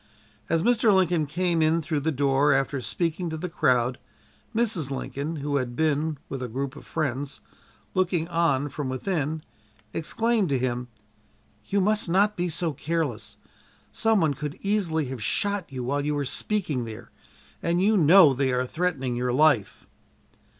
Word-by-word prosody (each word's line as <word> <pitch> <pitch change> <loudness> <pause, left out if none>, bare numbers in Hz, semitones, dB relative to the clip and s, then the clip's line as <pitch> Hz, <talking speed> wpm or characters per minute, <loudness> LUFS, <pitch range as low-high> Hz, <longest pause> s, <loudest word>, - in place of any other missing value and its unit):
As 165 -1 +1
Mr. 235 -1 +4
Lincoln 180 -5 +2
came 170 +2 0
in 160 +1 +3
through 155 -1 -2
the 160 +3 0
door 140 0 +3
after 135 0 0
speaking 170 +7 -2
to 160 - -4
the 180 - -4
crowd, 125 -6 +1 0.6
Mrs. 215 - +1
Lincoln 140 +3 -4
who 145 -1 -1
had 125 -2 -3
been, 155 +1 0
with 135 - -5
a 125 - -3
group 135 +4 -4
of - - -12
friends, 140 -3 -3 0.5
looking 180 -3 +1
on 165 -5 +1
from 140 -1 -4
within 155 +2 -2 0.5
exclaimed 220 +3 0
to 135 - +2
him: 125 -1 -2 0.8
"You 200 0 +1
must 210 -1 +2
not 200 +4 +3
be 175 0 -1
so 165 0 -1
careless. 150 -5 -3 0.5
Some 225 -2 +2
one 155 -3 +2
could 150 +3 -6
easily 185 -7 0
have 130 -3 -6
shot 200 - 0
you 130 -2 -4
while 140 +3 -1
you 150 0 -1
were 145 -1 -1
speaking 150 - -1
there 110 -1 -9 0.5
and 170 +1 +1
you 210 +4 +3
know 170 -3 +7
they 130 0 0
are 125 0 0
threatening 135 -5 -2
your 125 +1 -1
life!" 135 -5 +2
155 Hz, 165 wpm, -26 LUFS, 135-180 Hz, 0.8 s, know